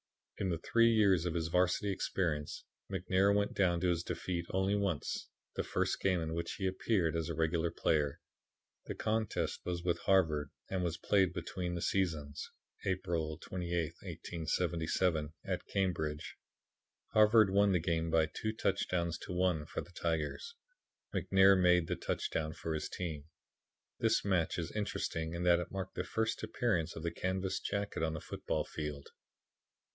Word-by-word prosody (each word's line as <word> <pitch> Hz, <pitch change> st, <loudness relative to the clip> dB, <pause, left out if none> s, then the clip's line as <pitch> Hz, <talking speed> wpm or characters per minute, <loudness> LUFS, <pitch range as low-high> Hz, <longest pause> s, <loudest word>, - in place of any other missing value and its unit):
In 95 Hz, -, 0 dB
the 85 Hz, -, 0 dB
three 115 Hz, +7 st, +4 dB
years 100 Hz, -6 st, +4 dB
of 85 Hz, -, -2 dB
his 85 Hz, -1 st, -1 dB
varsity 90 Hz, +3 st, +2 dB
experience 80 Hz, -6 st, -2 dB, 0.3 s
McNair 95 Hz, +1 st, +3 dB
went 100 Hz, 0 st, +1 dB
down 90 Hz, -3 st, +2 dB
to 90 Hz, -1 st, +3 dB
defeat 85 Hz, +1 st, -3 dB
only 95 Hz, +1 st, +1 dB
once, 100 Hz, -7 st, -1 dB, 0.3 s
the -, -, 0 dB
first -, -, 0 dB
game 95 Hz, -2 st, +2 dB
in 80 Hz, -1 st, -3 dB
which 85 Hz, 0 st, -2 dB
he 95 Hz, -, -3 dB
appeared 95 Hz, -3 st, +1 dB
as 80 Hz, -1 st, -1 dB
a 85 Hz, -, -2 dB
regular 80 Hz, +1 st, +1 dB
player. 75 Hz, -4 st, +1 dB, 0.7 s
The -, -, -5 dB
contest 110 Hz, 0 st, -1 dB
was 85 Hz, -1 st, -3 dB
with 85 Hz, -1 st, +1 dB
Harvard 80 Hz, -7 st, +2 dB, 0.2 s
and 95 Hz, -1 st, -1 dB
was 85 Hz, -1 st, -1 dB
played 95 Hz, -4 st, +3 dB
between 90 Hz, 0 st, -3 dB
seasons 80 Hz, -6 st, -1 dB, 0.3 s
April 85 Hz, -5 st, -1 dB
28th, 85 Hz, -2 st, -3 dB
1877 80 Hz, -1 st, -1 dB
at -, -, -3 dB
Cambridge. 80 Hz, -6 st, -1 dB, 0.7 s
Harvard 110 Hz, -1 st, +6 dB
won 100 Hz, +1 st, +4 dB
the 90 Hz, -, +4 dB
game 80 Hz, 0 st, 0 dB
by 80 Hz, -1 st, +4 dB
2 110 Hz, +8 st, -3 dB
touchdowns 90 Hz, -6 st, 0 dB
to -, -, -7 dB
1 90 Hz, -4 st, +1 dB
for -, -, -3 dB
the 85 Hz, -, -13 dB
Tigers. 85 Hz, -, -2 dB, 0.6 s
McNair 95 Hz, 0 st, +5 dB
made 90 Hz, -1 st, +5 dB
the -, -, -1 dB
touchdown 80 Hz, -1 st, -2 dB
for 80 Hz, -, -4 dB
his 75 Hz, -1 st, -3 dB
team. 80 Hz, -5 st, -4 dB, 0.7 s
This -, -, +2 dB
match 95 Hz, -5 st, +1 dB
is 85 Hz, -1 st, -3 dB
interesting 85 Hz, -5 st, -2 dB
in 85 Hz, -, -2 dB
that 85 Hz, -1 st, +5 dB
it 90 Hz, -, -4 dB
marked 95 Hz, -1 st, -5 dB
the -, -, -2 dB
first 110 Hz, 0 st, -1 dB
appearance 110 Hz, -6 st, 0 dB
of 80 Hz, -, -6 dB
the 85 Hz, -, -1 dB
canvas 95 Hz, +2 st, -1 dB
jacket 100 Hz, -3 st, -2 dB
on 80 Hz, -1 st, 0 dB
the 80 Hz, -, -4 dB
football -, -, -2 dB
field. 75 Hz, -2 st, -5 dB
90 Hz, 160 wpm, -34 LUFS, 80-95 Hz, 0.7 s, Harvard